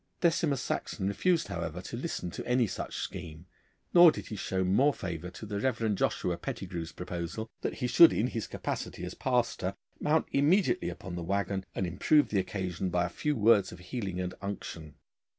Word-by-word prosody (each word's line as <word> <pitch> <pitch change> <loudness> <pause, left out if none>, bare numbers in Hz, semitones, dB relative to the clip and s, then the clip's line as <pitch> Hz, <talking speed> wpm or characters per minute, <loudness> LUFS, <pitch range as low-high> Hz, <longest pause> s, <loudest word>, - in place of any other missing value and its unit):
Decimus 160 -6 +2
Saxon 95 - -2
refused, 160 - +1
however, 85 -2 -4
to 100 - -6
listen 120 - -3
to - - -6
any 125 -1 +3
such 100 - -5
scheme, 85 -3 -6 0.5
nor 175 -2 +9
did - - -7
he 110 - -4
show 95 -1 -1
more 125 +11 +3
favour 85 -2 -5
to 100 - -9
the 100 -1 -3
Reverend 110 -4 0
Joshua 90 -2 0
Pettigrue's 85 -2 -5
proposal, 90 +6 -5
that - - -2
he - - -3
should 165 +7 +8
in 110 - +1
his 115 -4 -3
capacity - - -4
as - - -6
pastor 120 -7 0 0.2
mount 155 +2 +2
immediately 145 - +3
upon 90 +1 -7
the 85 - -4
waggon, 100 +2 -1
and 95 - 0
improve 120 - +3
the 100 - +1
occasion 95 -1 -2
by 90 0 +1
a - - -3
few 150 +11 -1
words 105 -3 +4
of 90 - -9
healing 95 0 -4
and 90 0 -2
unction. 85 -6 -6
100 Hz, 185 wpm, -30 LUFS, 90-125 Hz, 0.5 s, nor